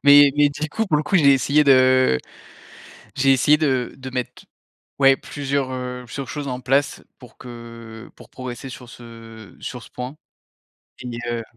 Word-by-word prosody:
Mais 145 -1 +8
mais, 145 -1 +5
du 150 +2 -5
coup, 220 +7 -2
pour 155 - +2
le 150 - 0
coup, 190 +6 +1
j'ai 140 -4 +6
essayé 140 +3 +3
de 130 - +4 1.0
j'ai 135 0 +4
essayé 140 +3 +4
de 130 -5 -1
de 130 0 -8
mettre, 125 -1 -5 0.6
ouais 135 -1 +6
plusieurs, 140 -1 -3
heu, 125 -1 -5
plusieurs 135 +3 -7
choses 145 -2 -5
en 125 0 -4
place 135 +3 0 0.2
pour 125 - -16
que 115 -2 -11
pour - - -16
progresser 130 0 -8
sur 125 -1 -11
ce 115 -4 -13
sur 125 -2 -7
ce - - -15
point 125 +3 -7 0.9
et 120 -2 -6
heu 115 -1 -3
130 Hz, 170 wpm, -21 LUFS, 120-140 Hz, 1.0 s, Mais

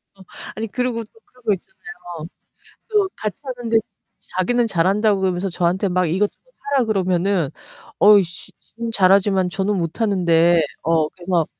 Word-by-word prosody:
어. 195 - -18 0.3
아니 225 - -3
그리고 245 +1 -2
또 340 - -21
그런 250 0 -25
거 215 -2 +2
있잖아요. 185 - -9 0.6
또 415 -3 +2
같이 215 +5 -4
하는데 245 -4 -2 0.6
자기는 235 +6 +2
잘한다고 200 +2 +2
그러면서 185 0 -1
저한테 180 +3 0
막 185 0 +1
이것저것 190 +6 0 0.4
하라 255 - +3
그러면은 185 -5 0 0.5
어우 205 -1 +7
씨 175 0 -10
지는 230 +1 -7
잘하지만 190 -2 +3
저는 195 +3 -1
못하는데 170 -2 +2 0.2
어 160 -2 +2
그래서 175 -3 -1
195 Hz, 330 characters per minute, -21 LUFS, 175-225 Hz, 0.6 s, 어우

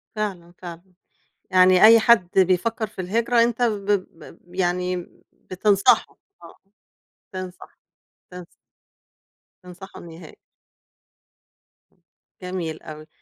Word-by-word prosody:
فعلًا، 185 -5 -5
فعلًا، 175 -1 -10 0.7
يعني 185 0 +5
أي 225 +1 +8
حد 215 -6 +3
بيفكر 200 +5 +1
في 195 -2 -8
الهجرة 230 +5 +1
أنت 235 0 -2
ب 210 -5 0 0.3
ب 175 +3 -16
يعني 180 -1 -2 0.3
بتنصحه، 195 +1 +1 0.3
آه، - - -15 0.8
تنصح، 185 -1 -9 0.5
تنصح. 180 -1 -10 1.2
تنصحه 180 +2 -12
إنه 170 - -12
يهاجر. 165 -2 -13 1.6
امم، - - -38 0.4
جميل 180 -3 -5
أوي 155 0 -11
185 Hz, 100 wpm, -22 LUFS, 175-210 Hz, 1.6 s, أي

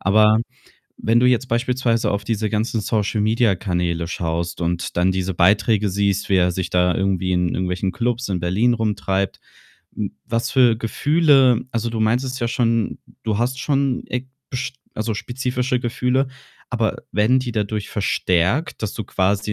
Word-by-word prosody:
Aber 105 +3 +4 0.6
wenn 115 +2 +2
du 125 - +4
jetzt 125 0 +2
beispielsweise 120 -1 +1
auf 100 - -1
diese 110 -1 -1
ganzen 110 +1 -1
Social-Media-Kanäle 105 -6 0
schaust 85 0 -3
und 85 0 -2
dann 90 +2 +3
diese 95 0 -2
Beiträge 100 +3 +3
siehst, 100 +1 0
wie 95 - +3
er 90 -1 +3
sich 95 +1 -3
da 90 0 +2
irgendwie 95 -1 0
in 90 0 +2
irgendwelchen 90 +2 -1
Klubs 120 +2 -2
in 95 - -1
Berlin 95 +8 +2
rumtreibt, 100 -3 -1 0.5
hm, - - -4
was 115 +2 -2
für 125 -4 +5
Gefühle 135 +1 +3
also, 115 0 -1
du 115 - -3
meintest 125 +4 0
ja 120 - +1
schon, 115 -3 0 0.3
du 110 -2 0
hast 125 +3 0
schon 140 -2 0
e 125 0 -2 0.3
bisch 130 0 -3 0.2
also, 110 +1 -2
spezifische 125 +2 -2
Gefühle, 125 +2 0 0.4
aber 115 -3 0 0.2
werden 110 +5 +3
die 125 -2 -3
dadurch 105 -1 -2
verstärkt, 100 - 0
dass 105 - -3
du 110 - -4
quasi 100 +3 0
110 Hz, 155 wpm, -21 LUFS, 95-125 Hz, 0.6 s, für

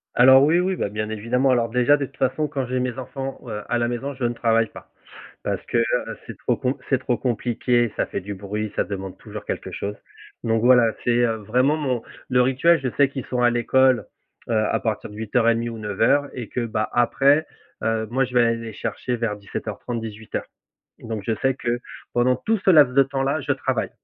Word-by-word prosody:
Alors 130 +2 +8
oui, 160 +4 +4
oui, 185 +1 0
bah 100 - -2
bien 105 +1 -3
évidemment. 120 +5 +1
Alors, 120 -2 +2
déjà, 125 +5 +4
de 140 - -2
toute 135 0 -17
façon 135 +4 0
quand 135 -2 -3
j'ai 130 +1 -2
mes 125 0 -2
enfants, 135 +1 -5
heu, 105 -2 -4
à 120 - +1
la 120 0 +1
maison, 130 +4 -3
je 125 - -6
ne 120 - +1
travaille 115 -1 +2
pas - - -13 0.5
parce - - -3
que, - - -2
heu, 115 - +4 0.4
c'est - - -8
trop - - 0
com 130 +2 -1
c'est 135 - +3
trop 125 -2 -1
compliqué, 120 -1 0
ça - - 0
fait - - -4
du 100 +2 -5
bruit, 105 +2 -4
ça - - +1
demande 95 -2 -6
toujours - - -9
quelque - - -4
chose 105 +1 -4 0.5
donc 115 -1 +1
voilà, 120 -2 +5
c'est, 120 0 +2
heu, 115 -1 +1
vraiment, 130 +6 +3
mon 130 -6 -1 0.3
le 125 0 +4
rituel, 135 +7 +4
je 130 - -1
sais 140 - +5
qu'ils 135 -2 -6
sont 125 - -2
à 120 - +6
l'école, 130 +2 +3 0.4
heu, - - -1
à 110 -1 +2
partir 110 -2 -2
de - - -11
08:30 115 +2 +1
ou 115 - -7
09:00 110 +7 +1
et 120 -4 -6
que, 125 - -2
bah 110 -1 -1
après, 140 +5 +3 0.4
heu, 110 0 0
moi, 135 +2 +2
je 125 - -11
vais 120 - +5
aller 115 0 +2
les 115 -1 -7
chercher 125 +2 -3
vers 115 -3 -2
17:30-18:00 110 +2 -5 0.5
donc 110 -3 -5
je 115 - +1
sais 135 0 +3
que 120 -1 -2 0.4
pendant 125 +1 +3
tout 220 - 0
ce - - +5
laps 145 -7 +6
de 140 - +8
temps-là, 135 +2 -1
je 140 - 0
travaille. 130 -4 -1
120 Hz, 215 wpm, -23 LUFS, 115-135 Hz, 0.5 s, Alors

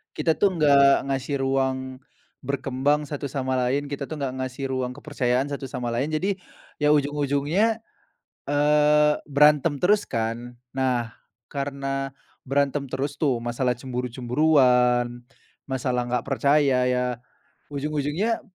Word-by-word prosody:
Kita 160 - +2
tuh 195 -2 +2
enggak 140 -3 +5
ngasih 135 +1 -2
ruang 130 -1 -1 0.5
berkembang 140 +2 0
satu 145 -1 -4
sama 130 -1 -2
lain, 135 +3 0
kita 140 -1 -4
tuh 155 -2 -6
enggak 130 -2 -2
ngasih 130 +1 -4
ruang 125 -1 -2
kepercayaan 130 -2 -1
satu 140 -1 -4
sama 120 -1 -4
lain. 135 +7 -1
Jadi, 190 +5 0 0.4
ya 150 0 +4
ujung-ujungnya, 145 +9 +1 0.6
eee, 150 +1 +4
berantem 150 0 +4
terus 205 +3 +4
kan. 120 +2 -4 0.2
Nah, 125 -4 -1 0.3
karena 135 -1 -3 0.4
berantem 140 +1 +1
terus 140 +2 -2
tuh, 135 -6 +1
masalah 125 +1 0
cemburu-cemburuan, 125 -1 +1 0.4
masalah 125 -2 -1
nggak 125 -1 -1
percaya. 140 -2 +3
Ya, 125 0 +1 0.7
ujung-ujungnya 150 +9 -1
135 Hz, 120 wpm, -24 LUFS, 125-150 Hz, 0.7 s, enggak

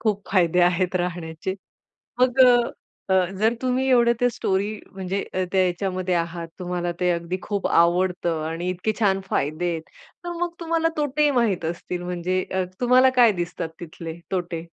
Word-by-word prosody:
खूप 210 -3 0
फायदे 180 -2 +3
आहेत 180 +1 +2
राहण्याचे. 175 0 -3 0.7
मग 255 +1 +3
अ, 240 -5 0
अ, 185 -1 +4 0.2
जर 225 +2 +3
तुम्ही 255 +1 +1
एवढं 235 -2 +5
ते 245 - +4
स्टोरी 200 -2 -1 0.2
म्हणजे 190 +1 -3
अ, 185 - +1
त्या 190 - +3
याच्यामध्ये 185 0 -1
आहात 170 0 -2
तुम्हाला 175 -1 -2
ते 180 0 +2
अगदी 170 +1 -2
खूप 200 -2 -2
आवडतं 175 -1 +2
आणि 170 +2 -3
इतके 185 +4 -1
छान 195 -3 +3
फायदे 155 +5 -1
आहेत, 165 -1 -3 0.4
तर 345 - -3
मग 345 -1 -1
तुम्हाला 330 0 +1
तोटे 295 0 +2
माहीत 195 -7 0
असतील 175 +2 -4
म्हणजे 180 +1 -1
अ, 190 0 +1 0.2
तुम्हाला 255 +1 +5
काय 230 -3 +7
दिसतात 170 -1 -5
तिथले 165 0 -8
तोटे? 175 -3 -2
185 Hz, 165 wpm, -23 LUFS, 175-220 Hz, 0.7 s, काय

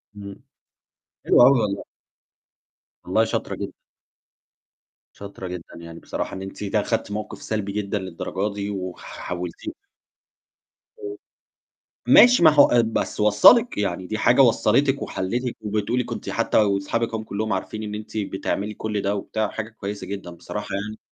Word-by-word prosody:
إمم، 100 -1 -10 0.8
حلو - - +6
أوي 130 0 +6
والله. 100 -2 -2 1.2
والله - - +2
شاطرة - - -3
جدًا. - - -5 1.4
شاطرة 100 -2 -8
جدًا، 90 -1 -8
يعني 85 0 -10
بصراحة - - -5
إن 95 - -6
أنتِ 95 +2 -7
ت 100 +2 -4
أخدتِ 105 0 0
موقِف 105 0 -5
سلبي 105 -2 -3
جدًا 105 0 -2
للدرجة 95 +2 -4
دي 100 0 -4 0.2
حَولتيه 90 - -6 1.3
إمم. 410 -2 -6 0.9
ماشي 245 -6 +7
ما 160 - +10
هو 145 -1 +7
آآ 120 - +4
بس 115 -1 -2
وصلِّك، 105 - +6
يعني 95 -2 -2
دي 110 - -3
حاجة 120 +4 +4
وصلتِك 135 +3 +3
وحليتِك 120 +6 -3
وبتقولي 105 +4 -1
كنتِ - - -6
حتى - - 0
وأصحابِك 105 +3 +1
أهم 110 -1 -3
كلّهم 110 0 -3
عارفين 110 +3 -4
إن 105 0 -5
أنتِ 110 +1 -7
بتعملي 100 0 -2
كل 105 -1 -3
ده 100 +1 0
وبتاع 110 +2 -2
وحاجة 110 +1 -5
كويسة 105 -2 -6
جدًا، 100 -3 -6
بصراحة 105 +4 -7
يعني 105 +2 -5
105 Hz, 145 wpm, -23 LUFS, 100-115 Hz, 1.4 s, ما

